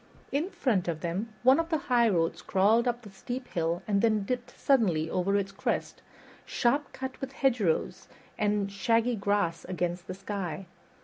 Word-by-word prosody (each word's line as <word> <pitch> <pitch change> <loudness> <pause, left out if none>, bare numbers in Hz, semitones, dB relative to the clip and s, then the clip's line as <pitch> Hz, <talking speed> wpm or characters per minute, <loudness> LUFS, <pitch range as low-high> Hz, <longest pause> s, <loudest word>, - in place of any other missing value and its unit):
In 305 +7 0
front 220 - 0
of 165 -2 -2
them, 185 +6 -3
one 260 +4 +6
of 330 0 -1
the 320 - +2
highroads 230 - +2
crawled 215 +5 +3
up 240 0 -1
the 205 - -11
steep 245 +6 -6
hill 170 0 -1
and 200 -2 +2
then 215 -3 +2
dipped 245 +3 -3
suddenly 190 - +3
over 195 +2 +1
its 195 -1 -2
crest, - - -2 0.4
sharp 275 +5 0
cut 260 0 -6
with 270 0 -5
hedgerow 235 -12 +2 0.5
and 205 -2 0
shaggy 230 +4 +2
grass 200 -4 0
against 180 0 -3
the 185 - -5
sky. 195 -2 -4
210 Hz, 165 wpm, -29 LUFS, 185-245 Hz, 0.5 s, one